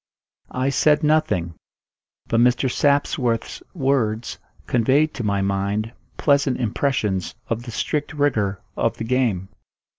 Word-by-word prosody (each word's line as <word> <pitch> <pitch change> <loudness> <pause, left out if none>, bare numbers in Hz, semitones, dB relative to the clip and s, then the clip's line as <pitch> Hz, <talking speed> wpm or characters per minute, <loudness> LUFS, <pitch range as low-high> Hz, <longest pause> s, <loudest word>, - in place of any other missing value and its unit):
I 130 +1 +1
said 150 +2 +3
nothing; 150 - +1 0.7
but 115 - +1
Mr. 125 +2 +3
Sapsworth's 135 -5 0
words 125 -7 0 0.3
conveyed 135 +6 +2
to 120 - -5
my 100 -2 0
mind 100 +3 -1 0.2
pleasant 140 -3 +2
impressions 110 -6 -1
of 115 0 -1
the 120 0 -8
strict 150 +6 -2
rigour 110 -10 0
of - - 0
the - - -4
game. 115 -7 0
120 Hz, 120 wpm, -22 LUFS, 105-140 Hz, 0.7 s, said